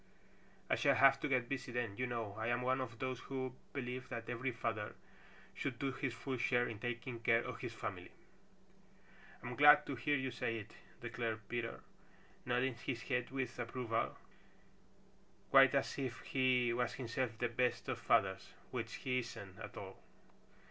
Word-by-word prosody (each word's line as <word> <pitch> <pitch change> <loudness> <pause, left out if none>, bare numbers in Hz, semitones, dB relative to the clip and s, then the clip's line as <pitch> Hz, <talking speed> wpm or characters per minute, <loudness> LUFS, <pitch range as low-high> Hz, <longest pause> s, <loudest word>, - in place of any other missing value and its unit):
I - - +2
shall - - +4
have 135 0 +7
to 150 - -1
get 130 -4 +2
busy 130 -1 -3
then. 120 -4 -1
You 125 +4 -1
know 115 -4 -3
I 110 - -1
am 120 +1 +1
one 130 +1 +2
of 115 -3 -5
those 130 0 -2
who 130 -2 -4 0.2
believe 125 -1 -4
that 115 0 -5
every 120 +2 -1
father 110 -2 -2 0.6
should 135 -4 -3
do 135 +2 -1
his 130 0 -2
full 130 +2 -4
share 120 0 +2
in 110 -3 -6
taking 120 +1 -3
care 115 0 +4
of 125 -2 -5
his 120 -2 -4
family." 100 -6 -5 1.3
"I'm 120 0 -4
glad 145 +2 +8
to 140 - -3
hear 145 +4 +1
you 130 -1 -2
say 115 -1 -1
it," 105 - -8 0.3
declared 110 -3 -3
Peter, 120 0 -3 0.7
nodding 125 0 +1
his 120 -4 -2
head 125 -2 0
with 130 -2 -3
approval 120 -1 -1 1.3
quite 135 0 +8
as 140 - 0
if 130 -3 -3
he 125 -2 +2
was 120 +1 0
himself 120 -2 -2
the 120 +1 0
best 125 +1 0
of - - -2
fathers, 95 -1 +2 0.2
which - - -3
he 125 -1 +2
isn't 110 -5 -7
at - - -8
all. - - -8
120 Hz, 170 wpm, -37 LUFS, 115-130 Hz, 1.3 s, glad